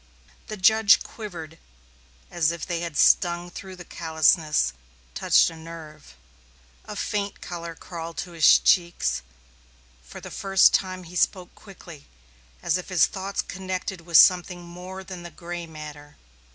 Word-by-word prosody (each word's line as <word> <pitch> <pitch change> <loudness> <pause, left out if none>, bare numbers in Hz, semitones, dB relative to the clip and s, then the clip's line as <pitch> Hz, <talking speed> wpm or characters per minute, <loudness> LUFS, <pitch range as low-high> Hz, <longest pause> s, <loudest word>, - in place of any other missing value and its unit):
The 215 - -6
judge 220 +2 +5
quivered 170 -7 -9 0.7
as 165 -2 +1
if 170 -1 -6
they 175 -2 -3
had 170 -3 -5
stung 175 0 +3
through 190 +1 -9
the 180 -1 -11
callousness, 160 - +1 0.4
touched - - +3
a - - -11
nerve. 160 - -12 0.7
A - - -8
faint 205 -1 -3
color 170 -1 -7
crawled 165 -1 -8
to 180 - -14
his 165 -2 +6
cheeks; 170 - +1 0.8
for 65 - -12
the - - -10
first 195 -1 +4
time 185 -1 -1
he 175 +1 -12
spoke 180 0 0
quickly, 175 -7 -14 0.6
as 185 - +1
if 180 - -9
his 180 -3 +4
thoughts 195 +1 -4
connected 185 -1 -5
with 165 -1 +3
something 180 -1 +5
more 180 +2 -9
than 185 -2 -9
gray 175 -1 -7
matter. 150 -2 -11
175 Hz, 140 wpm, -25 LUFS, 165-185 Hz, 0.8 s, his